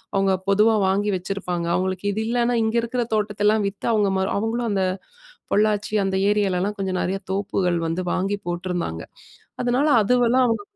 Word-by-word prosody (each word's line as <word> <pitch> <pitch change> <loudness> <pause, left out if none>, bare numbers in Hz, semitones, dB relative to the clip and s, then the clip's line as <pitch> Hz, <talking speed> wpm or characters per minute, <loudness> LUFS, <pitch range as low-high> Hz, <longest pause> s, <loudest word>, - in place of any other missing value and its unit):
அவங்க 195 0 +2 0.2
பொதுவா 210 +3 +4
வாங்கி 200 +2 +1
வச்சிருப்பாங்க. 180 -2 -3
அவங்களுக்கு 185 +2 -1
இது 210 - -3
இல்லன்னா 240 +1 +1
இங்க 220 +1 0
இருக்கிற 240 +2 -2
தோட்டத்தெல்லாம் 210 0 +1
வித்து, 200 0 -7
அவங்க 210 -2 +2
மரம் 190 0 -1
அவங்களும் 230 +3 -1
அந்த, 195 -2 +1 0.7
பொள்ளாச்சி 210 0 +1
அந்த 190 - -1
ஏரியாலலாம் 200 -1 0
கொஞ்சம் 190 -2 -2
நெறைய 190 +2 -1
தோப்புகள் 190 -3 0
வந்து 165 +3 -2
வாங்கி 195 +2 0
போட்ருந்தாங்க. 175 - -3 0.6
அதுனால 250 +4 +1 0.2
அதுவெல்லாம் 245 +3 +3
அவங்க 230 - -1
205 Hz, 150 wpm, -23 LUFS, 190-220 Hz, 0.7 s, பொதுவா